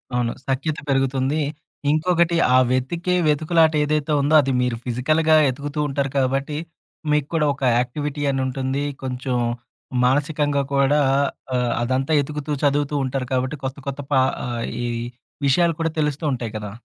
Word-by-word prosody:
అవును. 120 -1 +1 0.2
సఖ్యత 140 +3 -1
పెరుగుతుంది. 135 +2 +1 0.5
ఇంకొకటి 170 +1 +2 0.2
ఆ - - +7
వెతికే 170 +8 0
వెతుకులాట 160 +2 +3
ఏదైతే 150 +1 0
ఉందో 145 +3 +1
అది 135 - -1
మీరు 125 -1 0
ఫిజికల్‌గా 155 +6 +2
వెతుకుతూ 145 +3 -2
ఉంటారు 135 -1 -1
కాబట్టి, 135 +3 0 0.5
మీకు 150 -2 +2
కూడా 160 -2 +2
ఒక 135 0 -9
యాక్టివిటీ 145 +4 -2
అనుంటుంది. 130 +1 -1 0.2
కొంచెం, 125 -1 -2 0.7
మానసికంగా 145 +1 +1
కూడా 140 +2 +3 0.6
ఆహ్, 125 -1 +1
అదంతా 130 +4 0
ఎతుకుతూ 150 +1 -5
చదువుతూ 145 0 +1
ఉంటారు 130 -1 -3
కాబట్టి 130 +3 0
కొత్త 130 +1 -4
కొత్త 140 +1 -4
పా 135 - +5 0.2
ఆహ్, 120 -1 -3 0.2
ఈ - - -1 0.6
విషయాలు 170 +5 +3
కూడా 165 -1 0
తెలుస్తూ 150 +1 -1
ఉంటాయి 120 -3 -4
కదా! 105 -1 -6
140 Hz, 140 wpm, -22 LUFS, 130-150 Hz, 0.7 s, ఆ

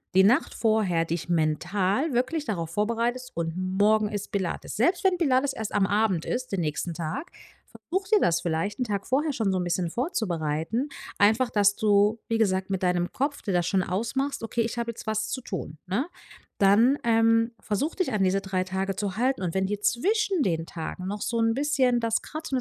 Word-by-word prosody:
die 190 - +7
Nacht 245 +10 +3
vorher 210 -7 +2
dich 170 +1 -4
mental 185 - +1
wirklich 260 +6 0
darauf 170 -7 -3
vorbereitest: 235 +6 -1
„Und 165 -1 -1
morgen 205 +3 +2
ist 205 -1 -5
Pilates”, 190 -4 -3
selbst 345 - +2
wenn 375 -2 +3
Pilates 275 -3 +2
erst 220 -2 -5
am 195 - +3
Abend 205 -5 +1
ist 255 +1 -3
den 195 -3 -1
nächsten 155 +2 -2
Tag, 165 - -4 0.4
versuche, 380 +2 -4
dir - - +5
das 170 0 +2
vielleicht 170 +7 -2
'n - - +2
Tag 200 -2 -3
vorher 290 +3 +1
schon 220 -6 0
so 185 - 0
'n - - -1
bisschen 175 -1 -1
vorzubereiten, 205 - -1 0.3
einfach, 220 +4 +4
dass 205 -1 +3
du, 210 +1 +3
wie 225 0 +1
gesagt, 190 -3 +1
mit 190 - -1
deinem 180 -1 +1
Kopf 280 +2 -2
dir 200 - -2
das 175 -1 +1
schon 190 -1 +2
ausmachst: 235 +10 -2
„Okay, 230 +1 -1
ich 230 +1 -2
habe 235 0 -2
jetzt 230 - -11
was 220 0 -1
zu 260 - -3
tun”, 170 -8 -6
ne? 230 - -1 0.5
Dann, 220 +8 +5
ähm, 230 0 +3
versuche, 270 - -2
dich 370 - 0
an 205 -2 +2
diese 190 +1 +2
3 190 -1 -1
Tage 190 +1 -2
zu 195 -1 -3
halten, 255 -2 +1
und 170 -2 -2
wenn 190 0 +1
dir 205 +1 -2
zwischen 390 - +1
den 165 -5 0
Tagen 170 +2 -6
noch 205 +1 -4
so 235 - -1
'n 225 0 +3
bisschen 265 -3 +2
das 225 -1 +1
kratzt 310 -1 -7
und - - +3
210 Hz, 205 wpm, -26 LUFS, 185-250 Hz, 0.5 s, die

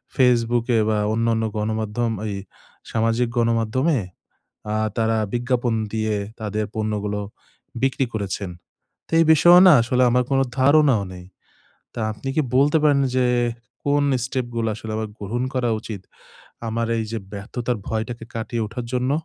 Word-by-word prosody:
Facebook 120 -2 +3
এ - - +4
বা 110 - +1 0.2
অন্যান্য 115 0 +1
গণমাধ্যম, 110 +2 -1 0.2
এই 100 - -3 0.6
সামাজিক 115 +2 +1
গণমাধ্যমে, 115 +6 +1 0.8
আ - - -1 0.2
তারা 115 0 +2 0.2
বিজ্ঞাপন 120 -1 0 0.2
দিয়ে 110 -1 0 0.3
তাদের 105 0 -2
পণ্যগুলো 105 -1 -2 0.6
বিক্রি 135 0 +2
করেছেন। 100 -2 -3 0.6
তে - - -22
এই - - +5
বিষয়েও 175 +3 +7
না - - +9
আসলে 125 +2 +1
আমার 125 +1 +2
কোনো 135 0 +3 0.2
ধারণাও 140 -5 +4
নেই। 90 0 -10 0.7
তা - - -4
আপনি 135 - -7
কী 155 - +4
বলতে 145 +3 +4
পারেন, 145 -2 +4 0.2
যে 130 -1 +3 0.6
কোন 145 0 +2 0.2
স্টেপ 130 -1 -2
গুলো 115 -1 0
আসলে 110 0 -6
আমার 110 0 -3
গ্রহণ 110 +5 -3
করা 125 -2 +1
উচিত, 105 -3 -7 0.7
আমার 115 +1 -1
এই 110 - -1
যে 115 - -1
ব্যর্থতার 120 +3 -3
ভয়টাকে 115 +1 -3
কাটিয়ে 115 0 -2
ওঠার 115 +3 -6
জন্য? 125 +1 0
115 Hz, 145 wpm, -22 LUFS, 110-125 Hz, 0.8 s, না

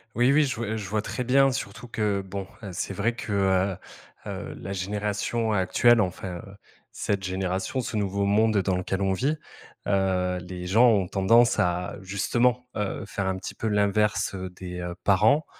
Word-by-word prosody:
Oui, 120 +3 +4
oui, 150 +1 +5
je 130 - -2
vois 110 -1 -3
je 100 -3 -5
vois 105 +2 0
très 125 +3 -4
bien 135 +2 +4
surtout 115 -1 -5
que, 105 -3 0
bon, 95 0 -5
hein, 100 -4 -7
c'est 95 +2 -3
vrai 115 +5 0
que, 105 -1 -4
heu 95 -1 +2 0.6
heu, - - -6
la 100 - -6
génération 105 +3 -1
actuelle, 110 +4 +4
enfin, 90 -2 -2 0.5
cette 100 -2 -1
génération, 95 +6 -2
ce 115 - -4
nouveau 100 -1 0
monde 105 +1 +3
dans 95 -1 0
lequel 95 +1 -2
on 95 - +2
vit, 135 +11 +1 0.5
heu, 95 -2 +1
les 90 0 -7
gens 115 +6 +5
ont 100 -5 +2
tendance 115 +5 +4
à 90 +1 0
justement, 120 +6 +1
heu, 105 -2 -2
faire 100 -2 -3
un 95 - 0
petit 95 - -7
peu 110 - -3
l'inverse, 105 0 +1
heu, 95 -1 -5
des, 90 -1 -7
heu, 90 0 -4
parents, 110 +10 +4
100 Hz, 180 wpm, -26 LUFS, 95-110 Hz, 0.6 s, oui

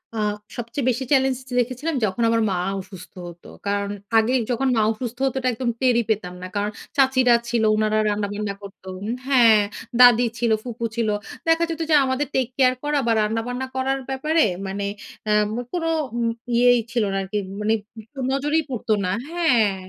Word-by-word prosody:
আ - - -4 0.4
সবচেয়ে 240 +2 -3
বেশি 255 +2 -1
চ্যালেঞ্জ 265 -2 +3 0.2
দেখেছিলাম 255 +6 -1
যখন 215 +4 -1
আমার 230 0 +2
মা 185 - 0 0.2
অসুস্থ 185 -1 -11
হতো। 170 0 -12 0.2
কারণ 200 0 0 0.3
আগে 225 +3 +3 0.2
যখন 265 +3 0
মা 220 - +3
অসুস্থ 235 +1 -5
হতো 270 - -1
এটা 255 -1 0
একদম 240 +1 -2
টেরই 245 -2 +3
পেতাম 195 -5 -1
না। 185 - -5
কারণ 205 +1 -1 0.3
চাচিরা 260 -2 +4 0.2
ছিল 235 -2 +1
উনারা 215 0 +1
রান্না-বান্না 205 0 -2
করত। 200 -2 -12 0.4
হ্যাঁ, 235 -6 +6 0.4
দাদি 245 -1 +8
ছিল 235 -2 +1
ফুপু 235 -1 -5
ছিল 230 -2 0 0.4
দেখা 325 +1 +4
যেত 330 0 -4
যে 310 - +5
আমাদের 260 +2 -1
টেক-কেয়ার 255 0 +2
করা 295 0 +1
বা - - +3
রান্না-বান্না 230 +4 -2
করার 265 +1 0
ব্যাপারে 305 +5 +2 0.2
মানে 200 +1 -3 0.5
আম 210 0 +3 0.2
কোন 350 -2 -2 0.3
উম 235 -1 +1 0.3
ইয়েই 245 0 +5
ছিল 235 -2 +1
না - - 0
আরকি 195 +2 -4 0.2
মানে 215 +1 +2 0.6
নজরেই 295 +4 +1
পড়তো 235 -3 -1
না, 180 - 0 0.2
হ্যাঁ। 245 - +2
240 Hz, 165 wpm, -23 LUFS, 215-265 Hz, 0.6 s, দাদি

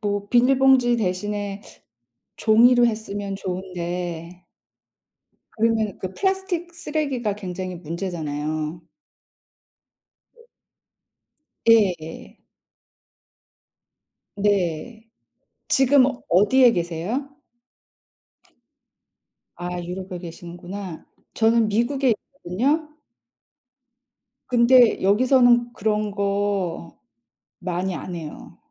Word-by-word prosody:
뭐 205 -1 -2
비닐봉지 255 0 +4
대신에 205 0 -3 0.8
종이로 240 +2 +5
했으면 205 -3 -3
좋은데. 180 -2 -5 1.1
그러면 220 -2 +1
그 185 0 -5
플라스틱 380 - -2
쓰레기가 290 -9 -2
굉장히 185 -2 -6
문제잖아요. 155 -2 -4 2.9
예예. 185 -8 +1 1.9
네. 205 +3 -1 0.6
지금 265 0 +5 0.2
어디에 235 +7 +5
계세요? 180 - -3 2.3
아 175 0 -5
유럽에 180 +1 -6
계시는구나. 175 +1 -8 0.3
저는 225 0 +3
미국에 255 +5 +1 0.2
있거든요. 280 - -1 1.6
근데 245 -1 +5
여기서는 240 +3 +4
그런 210 -1 -1
거 200 -4 -2 0.6
많이 180 0 -3
안 175 +4 -6
해요. 160 -3 -9
205 Hz, 165 characters per minute, -23 LUFS, 180-240 Hz, 2.9 s, 종이로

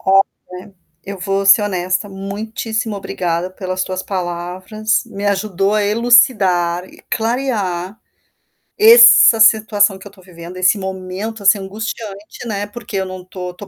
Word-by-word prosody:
Olha, 190 0 -1 0.3
eu 200 0 -7
vou 195 +1 -2
ser 195 +2 +6
honesta, 185 0 -2
muitíssimo 215 +3 -5
obrigada 180 -2 -3
pelas 185 0 -4
tuas 185 0 -4
palavras, 185 +4 -3
me 205 -3 -7
ajudou 200 0 0
a 215 - +1
elucidar 205 -6 +2
e - - -18
clarear 220 -6 -2 0.8
essa 440 - +7
situação 215 -2 +3
que 190 - -15
eu - - -11
estou 195 -2 -20
vivendo, 175 0 -11
esse 185 +3 +2
momento, 190 +3 -6
assim, 200 +1 +4
angustiante, 210 +2 -7
né, 205 -2 -3
porque 210 -1 -7
eu 190 - -1
não 185 0 -8
estou 185 -1 -7
estou 195 +3 -12
195 Hz, 140 wpm, -17 LUFS, 185-215 Hz, 0.8 s, essa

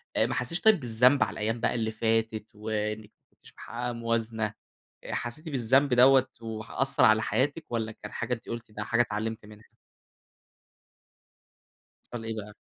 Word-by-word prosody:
آآ - - +3
ما - - -2
حسيتيش 125 +9 -1
طيب 220 -4 +5
بالذنب 125 +2 +4
على - - -4
الأيام 110 +2 -2
بقى 120 - 0
اللي 110 -2 -1
فاتت، 110 -1 -1
وإنك 105 0 -3
ما - - -55
كنتيش - - -18
محققة 120 +1 -4
موازنة، 115 -2 -2 0.5
آآ - - -5
حسيتِ 120 +8 -4
بالذنب 135 0 +3
دوَّة، 130 +1 +6
وح 110 -1 -6
أثر 135 -1 +2
على 110 -2 +5
حياتِك 135 +9 0
والّا 110 -1 -2
كان 105 -1 -10
حاجة 125 - -2
أنتِ 115 - -14
قلتِ 115 -1 -6
إنها 105 0 -5
حاجة 120 +2 0
اتعلمت 110 -1 -4
منها؟ 105 0 -17 2.4
w 120 -2 -5
إيه 115 0 -3
بقى؟ 105 -1 -7
115 Hz, 165 wpm, -28 LUFS, 110-125 Hz, 2.4 s, دوَّة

